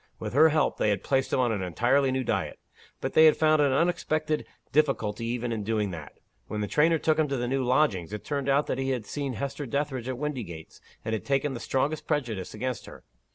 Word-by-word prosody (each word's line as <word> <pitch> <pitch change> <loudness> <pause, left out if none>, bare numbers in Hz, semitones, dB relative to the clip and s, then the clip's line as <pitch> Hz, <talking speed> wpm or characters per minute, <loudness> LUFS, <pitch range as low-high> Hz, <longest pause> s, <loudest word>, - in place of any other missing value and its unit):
With - - -5
her 155 +4 +7
help, 155 0 +1
they - - +2
had 100 - 0
placed 135 -1 0
him - - +1
on 125 -2 +2
an 105 -3 -1
entirely 125 +9 +2
new 130 0 0
diet. - - -2 0.4
But - - -3
they 160 - +7
had 155 - +6
found 155 -1 +4
an 140 -2 +3
unexpected 155 0 0 0.2
difficulty 115 -7 +1
even 120 0 -2
in 110 -2 -2
doing 105 -2 -1
that. 80 -4 -8 0.3
When 105 -1 -3
the 105 - -1
trainer 160 +6 +3
took 155 0 +1
him 155 - +3
to 140 -1 -2
the 120 0 -2
new 135 +1 0
lodgings, 120 - +1
it 105 - -6
turned 140 -2 -2
out 140 +2 +3
that 130 - -2
he 135 0 -1
had 125 -5 -2
seen 140 +2 -3
Hester 140 +5 -4
Dethridge 135 -1 -2
at 130 - -3
Windygates, 120 - -6 0.2
and 110 - -2
had 110 -4 -2
taken 140 0 0
the 120 - -5
strongest 140 +6 -1
prejudice 120 - -2
against 125 +1 -4
her. - - -12
130 Hz, 230 wpm, -27 LUFS, 110-150 Hz, 0.4 s, her